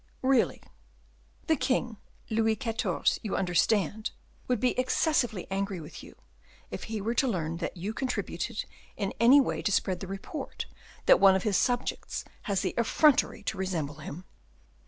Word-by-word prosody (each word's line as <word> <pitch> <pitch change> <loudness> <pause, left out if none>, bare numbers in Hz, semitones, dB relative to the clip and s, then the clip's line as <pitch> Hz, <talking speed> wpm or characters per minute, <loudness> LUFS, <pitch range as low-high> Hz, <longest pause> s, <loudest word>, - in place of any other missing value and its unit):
"Really." 260 -2 +2 0.8
"The 320 - +3
king, 250 -4 0 0.3
Louis 220 0 +2
XIV. 225 -2 0
you 215 - -3
understand 195 +3 +1 0.4
would 250 -3 +1
be 250 +3 +3
excessively 255 - +1
angry 195 -1 -2
with 150 - -9
you, - - -13 0.6
if - - -5
he 220 -1 -4
were 220 +4 -1
to 265 +2 +2
learn 165 -7 -1
that 175 +2 -4
you 195 +6 -3
contributed 225 -4 -3 0.3
in 200 -2 -2
any 245 +5 +8
way 275 - 0
to 205 - 0
spread 185 -2 +1
the 190 - -6
report 195 - -6 0.4
that - - +7
one 195 -1 +7
of 190 - 0
his 210 -3 +1
subjects 245 0 -1 0.2
has 195 -1 +1
the 185 - -1
effrontery 240 -1 +3
to 195 - -3
resemble 160 -6 -2
him." 155 +4 -8
210 Hz, 155 wpm, -29 LUFS, 190-245 Hz, 0.8 s, any